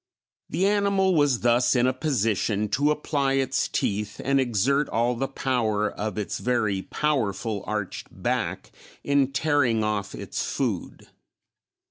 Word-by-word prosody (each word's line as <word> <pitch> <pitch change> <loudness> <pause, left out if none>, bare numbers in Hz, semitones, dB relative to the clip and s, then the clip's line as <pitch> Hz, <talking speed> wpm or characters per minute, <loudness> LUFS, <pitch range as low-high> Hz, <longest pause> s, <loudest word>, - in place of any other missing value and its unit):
The 190 - 0
animal 200 -2 +2
was 145 -6 +2
thus 120 +2 +3
in 120 0 +3
a 130 - +2
position 110 - 0
to 140 +7 +2
apply 145 -2 0
its 135 -1 +1
teeth 105 +1 -2
and 135 +1 +2
exert 130 +4 +1
all 120 +2 +1
the 130 +3 -2
power 110 -6 0
of 105 -2 -4
its 105 - -3
very 110 -6 0
powerful 115 -7 -1
arched 105 -3 -4
back - - -3 0.3
in 140 -1 +2
tearing 135 -6 +2
off 105 -2 -2
its - - -4
food. - - -3
125 Hz, 135 wpm, -25 LUFS, 105-140 Hz, 0.3 s, thus